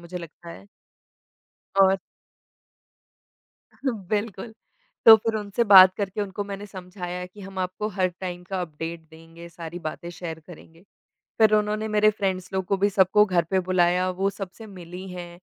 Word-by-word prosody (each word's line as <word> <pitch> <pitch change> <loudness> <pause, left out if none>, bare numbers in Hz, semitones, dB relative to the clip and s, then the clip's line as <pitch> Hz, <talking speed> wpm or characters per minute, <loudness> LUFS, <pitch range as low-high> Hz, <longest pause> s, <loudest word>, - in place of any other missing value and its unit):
मुझे 175 +1 -7
लगता 170 0 -12
है। 195 - -12 1.2
और 190 0 +5 1.9
बिल्कुल, 215 -1 -3 0.5
तो 225 -1 +12
फिर 225 0 -3
उनसे 210 +2 -1
बात 190 -2 +9
करके 200 0 -3
उनको 200 0 -4
मैंने 200 0 -7
समझाया 180 -2 -7
कि 190 +3 -16
हम 195 0 -9
आपको 185 +3 -3
हर 190 -3 0
टाइम 180 -1 -5
का 185 +1 -4
अपडेट 165 0 -6
देंगे, 165 +1 -13
सारी 170 0 -8
बातें 165 +1 -6
शेयर 165 -2 -7
करेंगे। 165 -1 -15 0.6
फिर 220 -1 +5
उन्होंने 210 +1 0
मेरे 215 0 +4
फ्रेंड्स 190 -3 -3
लोग 190 0 -1
को 195 - +1
भी 200 +2 +1
सबको 200 +2 +4
घर 180 -5 +1
पे 190 -1 +2
बुलाया, 180 0 +2
वो 190 +2 -1
सबसे 200 +3 -9
मिली 180 -1 -10
हैं, 175 -1 -9
185 Hz, 155 wpm, -24 LUFS, 175-205 Hz, 1.9 s, तो